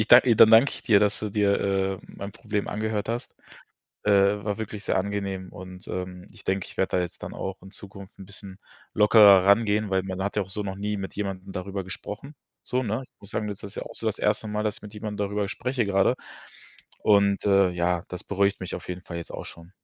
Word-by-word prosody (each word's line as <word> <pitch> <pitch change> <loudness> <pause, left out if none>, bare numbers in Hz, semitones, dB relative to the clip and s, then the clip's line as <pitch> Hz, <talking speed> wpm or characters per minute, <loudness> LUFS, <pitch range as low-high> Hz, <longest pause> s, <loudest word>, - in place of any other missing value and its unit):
ich 110 - 0
da 120 +1 +10
ich 120 -4 +3
dann 110 - +8
danke 115 +5 +7
ich - - -9
dir, 105 -4 +5
dass 105 -1 +2
du 105 - -4
dir, 100 -1 +2
äh, 95 -1 0
mein 100 0 -8
Problem 105 -2 -3
angehört 110 0 -2
hast. 120 +1 -4 0.7
Äh, 100 0 +3
war 105 -1 -1
wirklich 110 -1 -6
sehr - - +1
angenehm 95 -1 -3
und, 90 0 -10
ähm, 90 0 -5
ich 105 - -16
denke, 95 -1 -1
ich - - -14
werde 95 - +1
da 90 - +2
jetzt 90 - -7
dann - - -6
auch 95 0 -5
in 95 +1 -13
Zukunft 100 -1 -11
'n 95 - -9
bisschen 100 0 -11 0.4
locker 110 +1 +5 0.2
rangehen, 105 0 +3
weil 95 -1 +2
man 95 0 -4
hat 100 +1 -3
ja 105 - +2
auch 95 - -10
so 105 +2 -4
noch 95 -1 -5
nie 105 +1 -2
mit 95 -1 -6
jemandem 95 -2 -4
darüber 95 +1 -4
gesprochen. 105 +9 -8 0.3
So, 130 +1 -1
ne? 110 +3 -2
Ich - - -51
muss 100 - -12
sagen, 105 - -2
das 100 - -6
ist 100 - -8
ja - - -4
auch - - -9
so - - -6
das - - -1
1. 110 - 0
Mal, 105 0 -2
dass 105 - -2
mit 105 0 -11
jemandem 105 -1 -5
darüber 100 0 -2
spreche 125 +1 -1
gerade. 95 -1 +3 0.9
Und, 100 -1 +3
äh, 100 -2 +5
ja, 90 0 0
das 90 - -7
beruhigt 100 0 +1
mich 90 - -5
auf - - -8
jeden 90 0 -5
Fall 85 - -7
jetzt 85 - -8
auch - - -6
schon. 85 +1 -12
100 Hz, 240 wpm, -26 LUFS, 95-105 Hz, 0.9 s, da